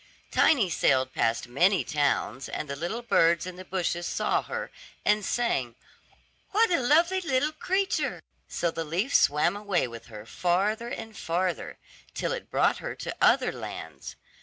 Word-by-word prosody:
Tiny 265 Hz, -11 st, +4 dB
sailed 130 Hz, -6 st, +2 dB
past 115 Hz, +1 st, 0 dB
many 180 Hz, +10 st, +3 dB
towns, 140 Hz, -3 st, -1 dB
and 155 Hz, -, -4 dB
the 140 Hz, -, -4 dB
little 175 Hz, +11 st, -4 dB
birds 170 Hz, -7 st, +3 dB
in 185 Hz, -1 st, -7 dB
the 185 Hz, -, -9 dB
bushes 175 Hz, -2 st, -2 dB
saw -, -, 0 dB
her, -, -, -5 dB, 0.3 s
and 210 Hz, 0 st, +3 dB
sang, 135 Hz, -, -1 dB, 0.7 s
"What 440 Hz, 0 st, +3 dB
a 340 Hz, -, +3 dB
lovely 335 Hz, +9 st, +3 dB
little 285 Hz, -2 st, +1 dB
creature;" 380 Hz, +5 st, -1 dB, 0.2 s
so 170 Hz, -, -1 dB
the 165 Hz, -, -3 dB
leaf 180 Hz, -, -2 dB
swam 150 Hz, +6 st, +4 dB
away 205 Hz, -7 st, 0 dB
with 115 Hz, -1 st, -10 dB
her 105 Hz, -2 st, -10 dB
farther 195 Hz, -, 0 dB
and 225 Hz, -2 st, -7 dB
farther, 175 Hz, -1 st, -2 dB, 0.4 s
till -, -, -1 dB
it -, -, -5 dB
brought -, -, +2 dB
her -, -, -5 dB
to -, -, -6 dB
other -, -, +4 dB
lands. -, -, -8 dB
185 Hz, 160 wpm, -27 LUFS, 150-240 Hz, 0.7 s, Tiny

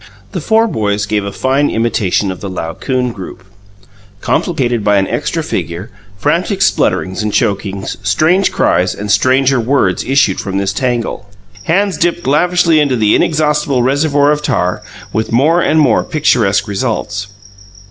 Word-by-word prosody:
The -, -, -4 dB
four 225 Hz, 0 st, +2 dB
boys 105 Hz, -, -1 dB
gave 105 Hz, -1 st, -1 dB
a 100 Hz, -, -4 dB
fine 135 Hz, +6 st, 0 dB
imitation 105 Hz, -4 st, 0 dB
of 95 Hz, -, -9 dB
the 100 Hz, -, -5 dB
Laocoon 120 Hz, +9 st, -3 dB
group 95 Hz, -3 st, -9 dB, 0.8 s
complicated 120 Hz, -4 st, -1 dB
by 105 Hz, 0 st, +3 dB
an 95 Hz, -1 st, +1 dB
extra 160 Hz, +7 st, -2 dB
figure 85 Hz, -, -4 dB, 0.3 s
frantic 185 Hz, -, 0 dB
splutterings 95 Hz, -, 0 dB
and 105 Hz, 0 st, -2 dB
chokings, 100 Hz, -1 st, -2 dB
strange 155 Hz, -, +2 dB
cries 90 Hz, -, +1 dB
and 105 Hz, 0 st, -4 dB
stranger 130 Hz, +4 st, +3 dB
words 130 Hz, +4 st, +1 dB
issued 135 Hz, -8 st, +2 dB
from 95 Hz, -1 st, -3 dB
this 100 Hz, 0 st, -1 dB
tangle; 120 Hz, -3 st, -2 dB, 0.4 s
hands 195 Hz, +3 st, +1 dB
dipped 175 Hz, 0 st, 0 dB
lavishly 170 Hz, +3 st, +3 dB
into 140 Hz, -4 st, +2 dB
the 110 Hz, -3 st, +2 dB
inexhaustible 150 Hz, -4 st, +1 dB
reservoir 145 Hz, +2 st, +2 dB
of 150 Hz, 0 st, 0 dB
tar, 90 Hz, -11 st, -1 dB, 0.3 s
with 110 Hz, +1 st, -2 dB
more 155 Hz, +9 st, +3 dB
and 160 Hz, -1 st, +2 dB
more 150 Hz, -, +3 dB
picturesque 115 Hz, -10 st, +1 dB
results. 105 Hz, -2 st, -3 dB
125 Hz, 145 wpm, -14 LUFS, 100-150 Hz, 0.8 s, by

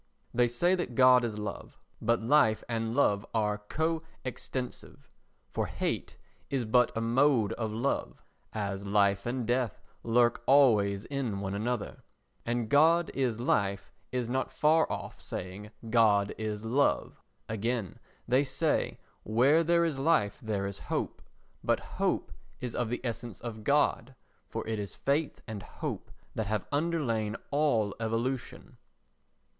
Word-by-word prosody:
They 120 Hz, 0 st, +4 dB
say 170 Hz, +10 st, +2 dB
that 175 Hz, -10 st, -2 dB
God 125 Hz, -1 st, +7 dB
is 110 Hz, -3 st, -2 dB
love, 105 Hz, -1 st, -6 dB, 0.2 s
but 115 Hz, -1 st, +1 dB
life 120 Hz, -3 st, +4 dB
and 115 Hz, 0 st, -2 dB
love 100 Hz, -8 st, +3 dB
are 105 Hz, -1 st, +1 dB
co 160 Hz, +10 st, -1 dB, 0.2 s
extensive; 130 Hz, 0 st, -5 dB, 0.4 s
for -, -, -1 dB
hate -, -, -3 dB, 0.3 s
is 135 Hz, -4 st, -1 dB
but 125 Hz, +2 st, +4 dB
a -, -, 0 dB
mode 120 Hz, -1 st, +3 dB
of 110 Hz, -2 st, -3 dB
love, 120 Hz, +6 st, -2 dB, 0.3 s
as 100 Hz, -2 st, -3 dB
life 100 Hz, 0 st, +2 dB
and 125 Hz, 0 st, -2 dB
death 120 Hz, -1 st, 0 dB, 0.2 s
lurk 120 Hz, 0 st, +3 dB
always 110 Hz, -8 st, +4 dB
in 130 Hz, -8 st, -2 dB
one 100 Hz, -1 st, -3 dB
another; 110 Hz, +2 st, -3 dB, 0.5 s
and 120 Hz, -1 st, 0 dB
"God 160 Hz, +6 st, +4 dB
is 125 Hz, -4 st, 0 dB
life" 100 Hz, -5 st, 0 dB, 0.2 s
is 125 Hz, -2 st, -1 dB
not 130 Hz, +2 st, -1 dB
far 160 Hz, +2 st, +3 dB
off -, -, -6 dB
saying 95 Hz, +3 st, -6 dB, 0.2 s
"God 110 Hz, -3 st, +4 dB
is 110 Hz, 0 st, -4 dB
love." 135 Hz, +5 st, +1 dB, 0.3 s
Again, 110 Hz, -1 st, -2 dB, 0.3 s
they 130 Hz, +3 st, +4 dB
say, 130 Hz, -, 0 dB, 0.2 s
"Where 130 Hz, +9 st, +4 dB
there 170 Hz, +1 st, +3 dB
is 150 Hz, -5 st, -2 dB
life 135 Hz, -9 st, +2 dB
there 105 Hz, -3 st, -2 dB
is 100 Hz, 0 st, -5 dB
hope," -, -, -2 dB, 0.4 s
but -, -, +2 dB
hope -, -, -2 dB, 0.3 s
is 125 Hz, -2 st, -4 dB
of 120 Hz, -2 st, -1 dB
the 120 Hz, -, -3 dB
essence 120 Hz, -3 st, -4 dB
of 110 Hz, -2 st, -7 dB
God, 135 Hz, -1 st, +2 dB, 0.3 s
for -, -, -4 dB
it 110 Hz, -1 st, -2 dB
is 100 Hz, -1 st, -5 dB
faith 145 Hz, +3 st, -1 dB
and 110 Hz, -3 st, -5 dB
hope -, -, -6 dB, 0.2 s
that 110 Hz, -2 st, -2 dB
have 105 Hz, -1 st, -1 dB
underlain 140 Hz, -9 st, 0 dB, 0.2 s
all 140 Hz, -9 st, +2 dB
evolution. 115 Hz, +3 st, -3 dB
120 Hz, 145 wpm, -30 LUFS, 105-135 Hz, 0.5 s, God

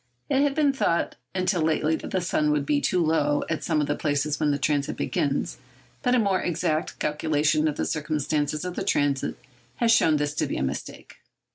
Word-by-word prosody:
It 270 Hz, -, +3 dB
had 285 Hz, -1 st, +1 dB
been 295 Hz, -3 st, +3 dB
thought 170 Hz, -10 st, 0 dB, 0.2 s
until 185 Hz, -1 st, +1 dB
lately 155 Hz, 0 st, +1 dB
that -, -, -8 dB
the 185 Hz, -, 0 dB
sun 155 Hz, -3 st, +1 dB
would 150 Hz, -1 st, +1 dB
be 145 Hz, 0 st, +1 dB
too 180 Hz, -2 st, +1 dB
low 145 Hz, -2 st, +1 dB
at 155 Hz, -, -2 dB
some 160 Hz, -2 st, +1 dB
of -, -, +1 dB
the 145 Hz, -, -1 dB
places 145 Hz, 0 st, -1 dB
when 150 Hz, -, +2 dB
the 145 Hz, -, +1 dB
transit 145 Hz, 0 st, 0 dB
begins, 140 Hz, -1 st, -1 dB, 0.4 s
but 250 Hz, 0 st, +2 dB
a -, -, +4 dB
more 200 Hz, -5 st, +2 dB
exact 160 Hz, -2 st, -1 dB
calculation 150 Hz, 0 st, +1 dB
of 150 Hz, -, -2 dB
the -, -, -1 dB
circumstances 150 Hz, 0 st, -1 dB
of 180 Hz, -1 st, -4 dB
the -, -, -2 dB
transit 140 Hz, -2 st, 0 dB, 0.4 s
has 235 Hz, -1 st, +2 dB
shown 160 Hz, -9 st, +4 dB
this 145 Hz, 0 st, -1 dB
to -, -, -1 dB
be -, -, -3 dB
a -, -, -1 dB
mistake. 65 Hz, -, -6 dB
155 Hz, 210 wpm, -25 LUFS, 145-175 Hz, 0.4 s, a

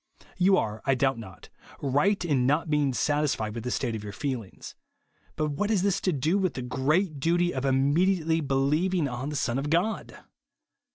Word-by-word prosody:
You 190 Hz, +1 st, +4 dB
are, 110 Hz, -5 st, -2 dB
I 135 Hz, -, +2 dB
doubt 135 Hz, -1 st, +1 dB
not, 95 Hz, -5 st, -12 dB, 0.3 s
ris^ht 150 Hz, +8 st, +1 dB
in 130 Hz, -5 st, +2 dB
not 155 Hz, +3 st, +1 dB
beins^ 145 Hz, -3 st, +1 dB
satisfied 145 Hz, -8 st, 0 dB
with 115 Hz, -1 st, -6 dB
the 125 Hz, -, -3 dB
state 120 Hz, -2 st, -1 dB
of 105 Hz, -, -6 dB
your 105 Hz, -, -6 dB
feelings; 125 Hz, -8 st, -5 dB, 0.6 s
but 155 Hz, -1 st, -1 dB
what 205 Hz, +9 st, -2 dB
has 205 Hz, -5 st, +2 dB
this 195 Hz, -1 st, +1 dB
to 185 Hz, -, +1 dB
do 160 Hz, +6 st, +1 dB
with 185 Hz, -3 st, -1 dB
the 125 Hz, -, -4 dB
great 145 Hz, +6 st, 0 dB
duty 175 Hz, +4 st, +1 dB
of 130 Hz, 0 st, -3 dB
immediately 160 Hz, +5 st, +2 dB
believing 150 Hz, +5 st, +1 dB
on 125 Hz, +2 st, -4 dB
the 150 Hz, -, -5 dB
Son 130 Hz, -2 st, 0 dB
of 145 Hz, +2 st, -3 dB
God 175 Hz, +8 st, -1 dB
145 Hz, 185 wpm, -27 LUFS, 130-175 Hz, 0.6 s, You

